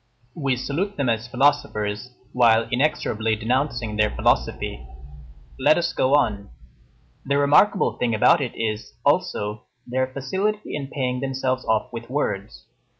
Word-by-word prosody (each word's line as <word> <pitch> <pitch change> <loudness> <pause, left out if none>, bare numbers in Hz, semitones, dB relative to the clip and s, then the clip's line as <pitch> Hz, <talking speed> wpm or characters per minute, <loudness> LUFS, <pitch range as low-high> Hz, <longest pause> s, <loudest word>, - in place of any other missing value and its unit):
We 135 -4 0
salute 165 +11 -3
them 140 -4 0
as 115 +1 -1
philosophers, 120 -4 0 0.2
while 115 -2 +4
inexorably 115 -5 0
denouncing 120 -1 -1
their 105 0 +3
philosophy. - - -1 0.8
Let 145 +4 +4
us 170 0 0
go 130 +2 +3
on. 105 -8 0 0.7
The 140 +1 0
remarkable 150 +8 +3
thing 120 -2 +1
about 145 +9 +4
it 130 - -4
is, 110 -1 -4
also, 105 +1 0 0.2
their 130 +1 -1
facility 190 +11 -3
in 140 -2 -4
paying 130 -3 -2
themselves 130 -1 -2
off 110 +2 0
with 115 0 -7
words. 100 - -3
125 Hz, 135 wpm, -23 LUFS, 110-140 Hz, 0.8 s, while